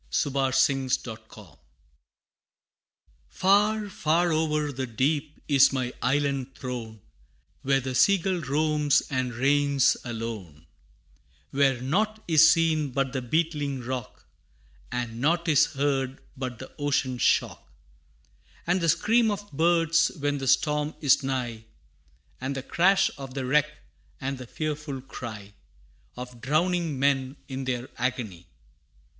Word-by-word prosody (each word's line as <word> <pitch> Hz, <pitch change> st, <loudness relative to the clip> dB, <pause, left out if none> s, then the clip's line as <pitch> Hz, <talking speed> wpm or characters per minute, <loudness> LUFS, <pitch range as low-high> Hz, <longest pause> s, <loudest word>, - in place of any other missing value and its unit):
[Illustration: 135 Hz, -1 st, +1 dB
The 125 Hz, -2 st, -1 dB
Sea 110 Hz, -, -19 dB
Bird] 100 Hz, -9 st, -15 dB, 1.7 s
Far, 210 Hz, +2 st, +2 dB
far 170 Hz, -2 st, +1 dB
o'er 155 Hz, -2 st, 0 dB
the 130 Hz, -1 st, -4 dB
deep 145 Hz, +6 st, -1 dB
is 140 Hz, -2 st, +5 dB
my 130 Hz, -2 st, -2 dB
island 135 Hz, 0 st, 0 dB
throne, 115 Hz, -5 st, -6 dB, 0.6 s
Where 135 Hz, 0 st, +2 dB
the 130 Hz, 0 st, -4 dB
sea 200 Hz, +10 st, +5 dB
gull 185 Hz, -1 st, -2 dB
roams 150 Hz, 0 st, +2 dB
and 130 Hz, -2 st, -1 dB
reigns 140 Hz, +2 st, +3 dB
alone; 110 Hz, -10 st, -6 dB, 0.9 s
Where 135 Hz, -2 st, +2 dB
nought 215 Hz, +10 st, 0 dB
is 160 Hz, -1 st, +7 dB
seen 160 Hz, -3 st, +2 dB
but 135 Hz, 0 st, -1 dB
the 130 Hz, -, -2 dB
beetling 145 Hz, 0 st, -1 dB
rock, 125 Hz, -1 st, -6 dB, 0.7 s
And 120 Hz, -1 st, -4 dB
nought 170 Hz, +4 st, +1 dB
is 150 Hz, -4 st, +5 dB
heard 135 Hz, -1 st, -1 dB, 0.2 s
but 130 Hz, -3 st, -5 dB
the 130 Hz, -, -10 dB
ocean 135 Hz, -3 st, 0 dB
shock, -, -, +1 dB, 0.9 s
And 180 Hz, +2 st, +1 dB
the 165 Hz, -, +1 dB
scream 220 Hz, +8 st, +3 dB
of 205 Hz, 0 st, -5 dB
birds 165 Hz, +1 st, +3 dB
when 145 Hz, -1 st, -1 dB
the 135 Hz, -, -4 dB
storm 150 Hz, +2 st, +1 dB
is 140 Hz, -2 st, +4 dB
nigh, 125 Hz, -4 st, -3 dB, 0.7 s
And 135 Hz, +2 st, -3 dB
the 135 Hz, -, -4 dB
crash 190 Hz, +6 st, +3 dB
of 135 Hz, -1 st, -8 dB
the 135 Hz, -2 st, -2 dB
wreck, 150 Hz, +3 st, +3 dB, 0.5 s
and 135 Hz, -1 st, -4 dB
the 125 Hz, -, -8 dB
fearful 150 Hz, -1 st, -4 dB
cry 110 Hz, -6 st, -8 dB, 0.6 s
Of 125 Hz, -1 st, -9 dB
drowning 165 Hz, +2 st, 0 dB
men, 135 Hz, 0 st, +1 dB
in 130 Hz, -1 st, -5 dB
their 125 Hz, -1 st, -2 dB
agony. 115 Hz, -8 st, -3 dB
135 Hz, 130 wpm, -26 LUFS, 130-155 Hz, 1.7 s, is